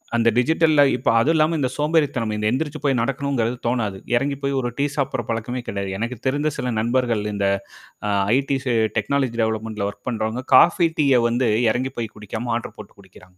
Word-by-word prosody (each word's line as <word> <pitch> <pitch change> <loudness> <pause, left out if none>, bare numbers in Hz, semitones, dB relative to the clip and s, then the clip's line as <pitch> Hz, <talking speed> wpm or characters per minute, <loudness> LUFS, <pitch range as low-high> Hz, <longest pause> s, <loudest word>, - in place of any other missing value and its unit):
அந்த 115 0 +3
டிஜிட்டல்ல 155 +3 +3
இப்ப - - -1
அதுவும் 150 +8 +3
இல்லாம 160 +1 +2
இந்த 130 -3 0
சோம்பேறித்தனம் 145 -7 0
இந்த 105 0 -1
எந்திரிச்சு 150 +3 -2
போய் 135 -3 +2
நடக்கணுங்கிறது 125 -2 -1
தோணாது. 115 -5 -1 0.2
எறங்கி 140 +3 0
போய் 140 0 0
ஒரு 120 - -2
டீ 140 - +2
சாப்பிடுற 135 -3 -1
பழக்கமே 120 +2 -3
கிடையாது. 100 -1 -3
எனக்கு 120 +2 -3
தெரிந்த 145 +3 0
சில 125 - -2
நண்பர்கள் 120 -2 0
இந்த 100 -1 0 0.6
அ - - +1 0.2
ஐடிசி 135 -1 0 0.2
டெக்னாலஜி 125 +2 0
டெவலப்மெண்ட்ல 110 -2 -2
வொர்க் 100 +2 -13
பண்றவங்க, 110 +1 -2
காஃபி 175 0 +6
டீய 140 -4 +4
வந்து 120 0 +1 0.2
இறங்கி 130 +4 -1
போய் 115 -2 -4
குடிக்காம 110 +3 -5
ஆர்டர் 120 - -9
போட்டு 105 - -12
குடிக்கிறாங்க. 90 -1 -18
125 Hz, 175 wpm, -22 LUFS, 110-140 Hz, 0.6 s, காஃபி